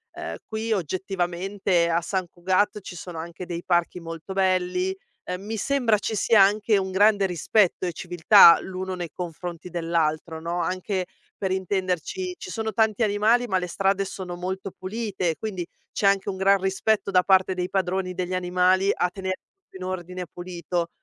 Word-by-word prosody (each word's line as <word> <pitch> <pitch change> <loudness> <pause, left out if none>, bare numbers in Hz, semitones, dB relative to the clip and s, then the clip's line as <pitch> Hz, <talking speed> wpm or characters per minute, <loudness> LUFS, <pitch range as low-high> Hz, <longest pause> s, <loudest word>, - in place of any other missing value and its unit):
Uhm, - - -5
qui 220 +1 -3
oggettivamente 185 0 -1
a 170 +1 +2
Sant 185 +1 -2
Cugat 190 +5 0
ci 180 - -9
sono 175 -1 -8
anche 170 +2 -7
dei 175 -1 -5
parchi 175 0 +1
molto 165 +2 -7
belli. 185 0 +1 0.3
Ehm, 180 +1 -5
mi 220 +2 -4
sembra 245 -3 +2
ci 215 - -3
sia 215 +2 +4
anche 205 +2 +4
un 190 -1 -2
grande 205 +1 +4
rispetto 185 +1 +1
e 175 - -3
civiltà 175 +1 +7
l'uno 190 0 -5
nei 175 -2 -5
confronti 175 0 -6
dell'altro, 165 -1 -1
no, 170 +2 -2
anche, 185 +2 -2 0.3
per 190 - -2
intenderci, 185 -1 -2
ci 185 - -8
sono 220 -1 -3
tanti 220 +1 +2
animali, 220 +4 +3
ma 190 -4 +1
le 180 - -1
strade 195 +2 +1
sono 185 -2 -6
molto 185 +2 -4
pulite, 190 -4 -3
quindi 190 -4 -4 0.3
c'è - - -2
anche 195 0 +2
un 190 - -4
gran 195 0 +4
rispetto 195 +2 0
da 180 -2 +4
parte 190 -1 +3
dei 180 0 -2
padroni 185 -1 -1
degli 180 0 -2
animali 185 +2 +2
a 180 - 0
tener 190 0 -3
tutto 390 - -29
in 185 - -8
ordine 180 0 -5
pulito. 175 -1 -3
185 Hz, 170 wpm, -25 LUFS, 175-195 Hz, 0.3 s, civiltà